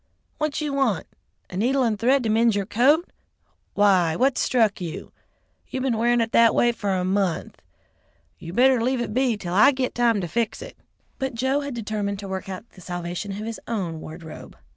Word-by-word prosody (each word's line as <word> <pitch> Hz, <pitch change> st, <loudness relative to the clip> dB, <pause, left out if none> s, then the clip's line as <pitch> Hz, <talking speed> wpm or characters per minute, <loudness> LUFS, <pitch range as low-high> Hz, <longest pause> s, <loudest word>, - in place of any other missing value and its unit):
What 305 Hz, 0 st, -1 dB
you 295 Hz, -2 st, -2 dB
want? 270 Hz, -8 st, +1 dB, 0.5 s
A -, -, -7 dB
needle 255 Hz, +7 st, +2 dB
and 220 Hz, -4 st, 0 dB
thread 260 Hz, +3 st, +3 dB
to 225 Hz, -, -1 dB
mend 225 Hz, 0 st, +3 dB
your 200 Hz, -1 st, -1 dB
coat? 280 Hz, -, +2 dB, 0.6 s
Why, 185 Hz, -5 st, +3 dB
what 260 Hz, +1 st, +2 dB
struck 220 Hz, -6 st, +1 dB
you? 170 Hz, -3 st, -6 dB, 0.6 s
You 260 Hz, -, -4 dB
been 260 Hz, -2 st, 0 dB
wearin' 240 Hz, +1 st, +2 dB
it 225 Hz, 0 st, -1 dB
that 230 Hz, 0 st, +6 dB
a -, -, -2 dB
way 240 Hz, -, +3 dB
for 205 Hz, -4 st, -2 dB
a 180 Hz, -1 st, -1 dB
month. 185 Hz, -, -1 dB, 0.8 s
You 165 Hz, -, -8 dB
better 250 Hz, +4 st, +4 dB
leave 255 Hz, +2 st, 0 dB
it 240 Hz, -, -3 dB
be 250 Hz, -2 st, +1 dB
'til 180 Hz, -4 st, -5 dB
I 215 Hz, +9 st, +6 dB
git 260 Hz, -2 st, -2 dB
time 235 Hz, -3 st, +2 dB
to 175 Hz, -, -3 dB
fix 230 Hz, +6 st, -2 dB
it." -, -, -11 dB, 0.4 s
But 265 Hz, -3 st, -3 dB
Joe 265 Hz, +4 st, +1 dB
had 280 Hz, -3 st, -5 dB
determined 210 Hz, -3 st, -3 dB
to 200 Hz, 0 st, -7 dB
work 190 Hz, +1 st, -5 dB
out 190 Hz, +4 st, -7 dB
the 185 Hz, -, -16 dB
salvation 175 Hz, +3 st, -5 dB
of 210 Hz, +2 st, -5 dB
his 225 Hz, 0 st, -5 dB
own 185 Hz, -8 st, -3 dB
wardrobe. 160 Hz, 0 st, -10 dB
225 Hz, 205 wpm, -24 LUFS, 195-255 Hz, 0.8 s, that